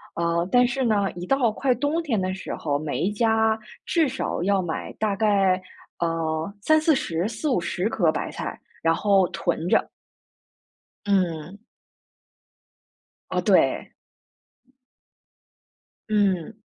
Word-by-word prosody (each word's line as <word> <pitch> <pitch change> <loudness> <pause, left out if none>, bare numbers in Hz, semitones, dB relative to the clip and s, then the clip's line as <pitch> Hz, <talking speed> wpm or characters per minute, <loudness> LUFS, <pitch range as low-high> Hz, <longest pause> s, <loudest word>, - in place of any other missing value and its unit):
呃， 170 +1 0
但 245 0 +5
是 265 +2 -1
呢， 205 -4 +1
一 175 +1 -6
到 265 -5 +2
快 255 +3 +1
冬 290 +7 0
天 235 -9 0
的 185 0 -1
时 190 - -5
候， 145 -2 -1
每 155 -2 -3
一 195 - +1
家 220 0 +2 0.3
至 325 -4 +2
少 265 -8 -3
要 195 0 +2
买 170 -3 -4
大 210 -2 -1
概， 195 -3 +2 0.4
呃， 165 +1 -1
30-40、 280 - +2
40-50 215 - -1
颗 175 -8 +2
白 - - -4
菜， - - -6 0.2
然 165 0 +3
后 195 0 +3
囤 165 - -2
着。 - - +3 1.2
嗯。 185 -2 0 1.7
哦 - - 0
对。 - - +2 2.2
嗯。 200 -2 +1
200 Hz, 120 characters per minute, -24 LUFS, 170-230 Hz, 2.2 s, 但